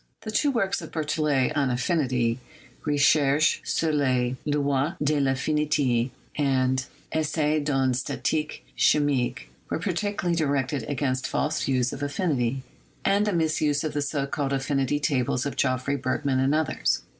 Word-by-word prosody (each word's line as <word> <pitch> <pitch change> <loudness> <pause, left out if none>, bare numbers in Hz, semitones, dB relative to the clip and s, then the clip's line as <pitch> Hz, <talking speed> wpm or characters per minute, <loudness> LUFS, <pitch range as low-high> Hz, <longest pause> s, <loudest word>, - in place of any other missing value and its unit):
The 215 - -5
two 285 +7 +2
works 200 -7 0
of - - -9
Berthollet 150 -3 0
on 140 -3 +2
affinity 125 -3 0 0.2
— - - -26
"Recherches 145 0 +3
sur 160 -1 0
les 130 -4 +1
Lois 145 +2 +1
de 150 +1 +1
rAffinite" 135 -2 +1 0.3
and 130 -2 +1 0.3
"Essai 155 -1 +1
d'une 135 -3 +1
Statique 150 +4 -2
Chi - - +4
mique" 125 -4 -1
— - - -35
were - - -1
particularly 180 0 -1
directed 140 -3 0
against 130 -2 -1
false 155 +2 -1
views 130 -2 +1
of 140 - -7
affinity 140 -4 -1 0.4
and 200 +2 +3
the - - +2
misuse 155 -3 +1
of 155 -2 -2
the 145 - -1
so 140 -1 -1
called 140 0 -2
affinity 135 +1 0
tables 130 -3 0
of 140 - -3
Geoffrey, 130 +1 0
Bergman, 130 +1 0
and 135 +3 +2
others. - - 0
145 Hz, 150 wpm, -26 LUFS, 130-155 Hz, 0.4 s, Chi